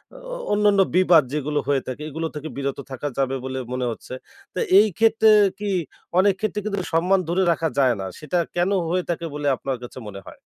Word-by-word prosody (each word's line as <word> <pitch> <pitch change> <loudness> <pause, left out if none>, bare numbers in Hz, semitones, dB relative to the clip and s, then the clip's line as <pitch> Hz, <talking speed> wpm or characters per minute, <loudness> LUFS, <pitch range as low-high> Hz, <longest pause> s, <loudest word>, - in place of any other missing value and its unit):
অ - - -10 0.2
অ - - -3 0.2
অন্যান্য 205 -1 +3 0.2
বিবাদ 180 -4 +6
যেগুলো 150 0 -1
হয়ে 140 -2 +2
থাকে। 130 +3 -5
এগুলো 160 +2 -3
থেকে 150 +1 -5
বিরত 140 -1 -2
থাকা 130 +2 -4
যাবে 135 -1 0
বলে 130 0 -4 0.2
মনে 125 0 -1
হচ্ছে। 115 - -9 0.4
তো - - -3 0.2
এই 215 - +5
ক্ষেত্রে 220 0 +4 0.3
কি 205 0 -3 0.5
অনেক 200 +1 +4
ক্ষেত্রে 215 -1 -2
কিন্তু 200 -2 -2
সম্মান 180 +4 +3
ধরে 180 +3 +1
রাখা 165 0 0
যায় 130 -3 +4
না। 95 - -4
সেটা 155 +4 -2 0.2
কেন 175 +2 +1 0.2
হয়ে 180 +1 0
থাকে 170 0 -2
বলে 145 -1 -2
আপনার 130 0 -4
কাছে 120 - -10
মনে 100 -1 -9
হয়? - - -12
160 Hz, 205 wpm, -23 LUFS, 135-195 Hz, 0.5 s, বিবাদ